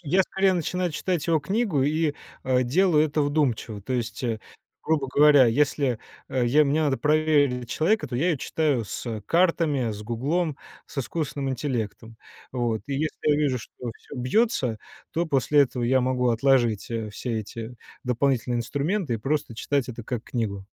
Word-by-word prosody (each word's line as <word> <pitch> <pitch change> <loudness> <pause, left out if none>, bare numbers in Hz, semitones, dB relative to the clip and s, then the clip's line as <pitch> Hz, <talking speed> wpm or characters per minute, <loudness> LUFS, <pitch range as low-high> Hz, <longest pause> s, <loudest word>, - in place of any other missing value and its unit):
я 180 +5 +3
скорее 190 +1 +1
начинаю 180 0 -1
читать 175 +1 -1
его 165 -3 +2
книгу 195 - 0
и, 150 +1 +1 0.3
э, 130 -1 +2
делаю 155 +4 +3
это 150 0 -1
вдумчиво. 135 -8 0
То 130 - -4
есть, 115 -1 -3
э, 115 -3 -1 0.4
грубо 150 -4 0
говоря, 145 -1 +6
если, 135 0 +1 0.3
э, 125 -2 0
я 150 +5 +5
мне 150 +3 +1
надо 140 -3 +1
проверить 145 -5 +2
человека, 170 +1 +1
то 125 - -6
я 140 +8 +1
её 165 - +2
читаю 140 -4 0
с, - - -6
э, 110 -2 -3
картами, 165 -8 +2
с 105 0 -6
"Гуглом", 140 +8 -1 0.3
с - - -8
искусственным 140 0 -2
интеллектом. 115 -4 -4 0.4
Вот. 120 -3 -1
И 140 - -4
если 155 +3 -2
я 150 - +4
вижу, 140 -4 +1
что 110 - -12 0.2
всё - - -13
бьётся, 130 - +1 0.3
то 170 +1 0
после 145 0 +3
этого 125 -2 -2
я 130 +2 +3
могу 125 0 +1
отложить, 120 -3 +2
э, 110 -2 -3
все 115 +1 -3
эти 115 +3 -8 0.3
дополнительные 125 -1 +1
инструменты 145 - -1
и - - 0
просто 140 +2 -2
читать 140 -1 -1
это 120 -2 -7
как 120 -1 -3
книгу. 100 -6 -3
135 Hz, 175 wpm, -25 LUFS, 120-155 Hz, 0.4 s, говоря